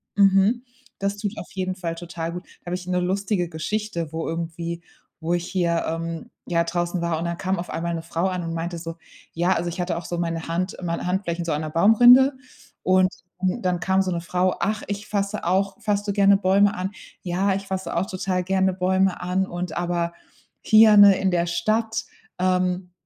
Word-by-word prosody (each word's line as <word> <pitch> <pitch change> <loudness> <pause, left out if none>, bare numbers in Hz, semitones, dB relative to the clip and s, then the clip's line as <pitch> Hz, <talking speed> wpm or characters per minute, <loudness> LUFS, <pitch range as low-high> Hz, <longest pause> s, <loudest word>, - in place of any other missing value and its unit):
Mhm. 200 +4 +4 0.4
Das 200 +1 -1
tut 205 -1 -2
auf - - -8
jeden 185 -1 -2
Fall 170 -3 -4
total 170 -1 -5
gut. 180 +1 -6 0.2
Da - - -21
hab - - -1
ich 180 0 -5
'ne 180 0 +1
lustige 185 -1 -1
Geschichte, 170 0 -3
wo 160 - -3
irgendwie 170 +1 -4 0.4
wo 165 +2 -1
ich 175 0 -2
hier, 170 -3 0
ähm, 165 0 -4 0.2
ja 170 -1 +2
draußen 175 +1 -2
war 170 -2 0
und 170 - -3
dann 170 0 -2
kam 190 -1 -1
auf 180 - -5
einmal 170 +1 -2
'ne 165 - -3
Frau 170 +2 -1
an 180 -1 -2
und 165 0 -4
meinte 170 +1 -3
so: 165 0 -6 0.4
Ja, 175 +3 +2
also 175 +1 -1
ich 170 - -7
hatte 175 -1 -1
auch 170 - -6
so 175 - -4
meine 165 -1 -2
Hand 175 +3 -2
meine 170 0 -2
Handflächen 175 -2 -1
so 165 - -1
an 150 - -1
'ner 155 - -4
Baumrinde. 245 - +7 0.5
Und 185 0 +4 0.3
dann 185 +5 -1
dann 180 -1 +1
kam 190 0 +2
so 185 - -2
'ne 170 -1 -2
Frau: 180 +2 0
„Ach, 215 +1 -1
ich 205 +1 -4
fasse 200 0 -2
auch 195 +5 +1
fasst 205 -1 -1
du 200 - 0
gerne 200 -1 +5
Bäume 200 +1 +3
an? 185 +2 -3 0.3
Ja, 190 +2 +1
ich 195 0 -5
fasse 190 -3 -3
auch 180 +3 0
total 185 -1 -2
gerne 190 0 +1
Bäume 190 0 +1
an 185 +2 0
und 175 -2 -5
aber 170 -1 -1 0.5
hier, 215 -1 +7
ne, 200 -2 +8
in 190 -1 +1
der 175 -1 +1
Stadt, 220 +6 0 0.4
ähm, 180 0 0
180 Hz, 210 wpm, -23 LUFS, 170-195 Hz, 0.5 s, ne